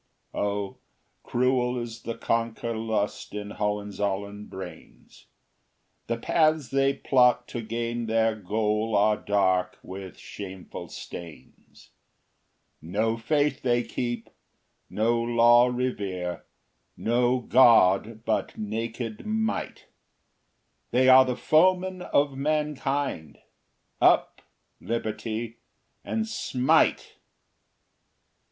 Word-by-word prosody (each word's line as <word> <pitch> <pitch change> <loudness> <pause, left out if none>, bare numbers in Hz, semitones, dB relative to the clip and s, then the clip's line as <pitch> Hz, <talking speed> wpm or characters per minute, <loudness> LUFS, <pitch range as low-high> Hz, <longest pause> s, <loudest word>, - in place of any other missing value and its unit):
O 100 -1 -2 0.4
cruel 125 0 +1
is 115 -1 -6
the 115 0 -5
conquer 115 0 -1
lust 110 -2 -2
in 105 0 -5
Hohenzollern 105 0 -3
brains; 95 -2 -11 0.8
The 115 - -1
paths 155 +1 +2
they 135 0 +2
plot 125 -2 +3
to 120 - -4
gain 115 +1 -3
their 115 0 +2
goal 105 +2 -1
are 105 +1 +4
dark 95 -3 0
with 95 -2 -9
shameful 95 -2 -8
stains: 80 -7 -11 0.9
No 110 +7 -1
faith 145 +4 0
they 120 -1 +1
keep, 120 -3 -4 0.6
no 115 +2 +1
law 120 +1 +5
revere, 100 -8 -3 0.5
no 120 +2 +2
god 115 -3 +4
but - - -1
naked 115 +1 -4
Might; 220 0 -2 1.0
They 130 +1 +3
are 130 0 +8
the 125 -1 -1
foemen 185 +3 +2
of 145 -5 +1
mankind. 140 - -2 0.6
Up, - - +3 0.4
Liberty; 115 0 -4 0.5
and 225 0 -2
smite! 130 - +1
115 Hz, 95 wpm, -26 LUFS, 105-130 Hz, 1.0 s, are